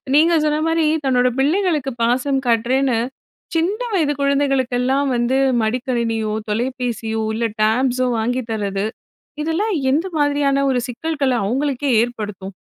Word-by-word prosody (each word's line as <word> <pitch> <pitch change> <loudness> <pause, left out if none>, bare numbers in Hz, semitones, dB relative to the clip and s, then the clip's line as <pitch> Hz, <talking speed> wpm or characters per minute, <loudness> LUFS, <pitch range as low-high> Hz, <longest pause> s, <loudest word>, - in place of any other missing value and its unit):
நீங்க 325 +3 +5
சொன்ன 300 0 +1
மாரி 325 -1 +2 0.2
தன்னோட 250 -1 +3
பிள்ளைகளுக்கு 305 -2 +1
பாசம் 260 +3 +1
காட்டுறேன்னு, 240 +2 +2 0.6
சின்ன 355 +7 +1
வயது 310 -6 +2
குழந்தைகளுக்கெல்லாம் 275 -1 +1
வந்து 240 +2 +1 0.3
மடிக்கணினியோ, 230 -2 -1 0.2
தொலைபேசியோ, 235 -1 -2
இல்ல 230 +1 -1 0.2
டேப் 235 +5 +3
ஸோ 255 - +2
வாங்கி 245 +3 0
தர்றது, 200 -2 -2 0.6
இதெல்லாம் 335 +8 0 0.2
எந்த 310 +6 +1
மாதிரியான 285 -1 +2
ஒரு 255 -2 +1
சிக்கல்களை 275 +1 -1
அவங்களுக்கே 275 +3 -1
ஏற்படுத்தும். 210 -5 -6
260 Hz, 120 wpm, -20 LUFS, 235-290 Hz, 0.6 s, நீங்க